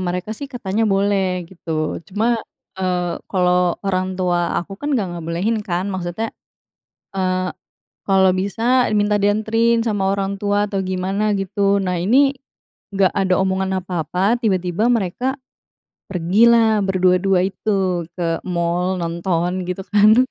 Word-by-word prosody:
mereka 180 +2 -3
sih, 275 +6 -7
katanya 225 -4 -1
boleh, 195 -2 +1
gitu. 165 -3 -4
Cuma, 225 +4 0 0.4
eee, 180 -2 -1
kalau 180 -2 +2
orang 185 -1 -1
tua 175 -2 0
aku 185 +3 -6
kan 290 - -3
nggak 205 -6 -1
ngebolehin, 170 +7 -1
kan. 180 -3 -2
Maksudnya, 185 +4 -3 0.9
eee, 185 -1 0 0.5
kalau 190 -1 +4
bisa, 230 +7 +1
minta 205 0 +2
dianterin 225 +3 +2
sama 200 -3 +1
orang 195 0 -1
tua 205 +1 0
atau 195 -1 -2
gimana, 190 +3 -1
gitu. 200 +1 +1
Nah 185 -2 -1
ini, 270 +8 +4 0.6
nggak 195 -2 +3
ada 190 -1 +2
omongan 190 0 0
apa-apa, 180 +6 0
tiba-tiba 190 -1 +1
mereka 245 +4 0 0.7
pergilah 215 +5 +4
berdua-dua 185 -1 +2
itu 190 -4 -1
ke 165 -2 -1
mall, 175 +1 0
nonton, 170 +1 -1
gitu 180 +1 -4
kan. 215 +5 +5
190 Hz, 125 wpm, -20 LUFS, 180-210 Hz, 0.9 s, kan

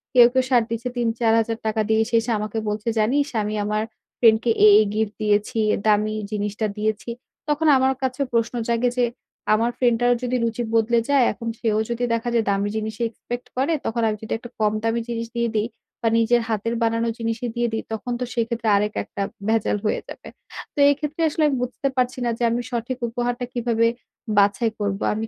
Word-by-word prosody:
কেউ, 240 -1 +9
কেউ 260 0 +3
shirt 240 -3 +4
দিচ্ছে 230 +2 -2
৳৩-৪,০০০ 225 -1 +1
দিয়ে। 220 0 +3
সে 235 - 0
এসে 230 +1 -3
আমাকে 215 +1 -4
বলছে 210 +2 -4
জানিস 275 +7 +2
আমি 210 +1 -2
আমার 210 +1 0 0.4
friend 225 -2 +6
কে 235 - +2
এই, 210 - +9
এই 215 - +4
gift 215 -1 0
দিয়েছি, 210 +2 +1 0.3
দামি 215 0 +2 0.2
জিনিসটা 210 +1 -2
দিয়েছি। 215 +2 -2 0.4
তখন 300 +2 +1
আমার 265 +1 +3
কাছে 260 +1 -1
প্রশ্ন 230 0 +1
জাগে 235 +1 +2
যে 245 - +4 0.5
আমার 230 +3 +2
friend 240 -2 +3
টারও 245 0 +3
যদি 250 +1 -1
রুচি 230 +1 -1
বদলে 230 +1 +3
যায় 280 -3 +5
এখন 230 -1 -7
সেও 215 -2 +1
যদি 235 +1 -2
দেখা 230 +1 -1
যায় 230 -2 +2
দামি 200 +1 +1
জিনিসই 220 +1 -2
expect 240 +2 -7
করে 275 +6 +1
তখন 235 +1 -1
আমি 215 -1 -1
যদি 220 - -4
একটা 240 +1 -11
কম 215 -1 +2
দামি 225 +1 0
জিনিস 230 -1 -3
দিয়ে 235 -1 0
দেই 215 +2 +1 0.3
বা 230 - +1
নিজের 235 +1 +3
হাতের 225 +2 -1
বানানো 230 0 +1
জিনিসই 230 +1 -2
দিয়ে 240 0 +1
দেই 220 - -2
তখন 245 +3 -4
তো 250 - -1
সেক্ষেত্রে 230 -1 -2
আরেক 210 +1 +1
একটা - - -7 0.3
ভেজাল 220 -2 +1
হয়ে - - +1
যাবে। - - -10 0.5
তো - - -38
এই 285 - +3
ক্ষেত্রে 300 +2 -4
আসলে 310 +1 -1
আমি 275 - +1
বুঝতে 255 +2 -2
পারছি 250 0 +1
না 235 - +1
যে 240 - -3
আমি 240 +1 0
সঠিক 240 +1 -3
উপহারটা 245 +1 -2
কিভাবে 230 -2 +1 0.5
বাছাই 205 +3 +2
করব? 200 -1 -1 0.2
আমি 220 +1 -3
230 Hz, 200 wpm, -23 LUFS, 215-245 Hz, 0.5 s, কেউ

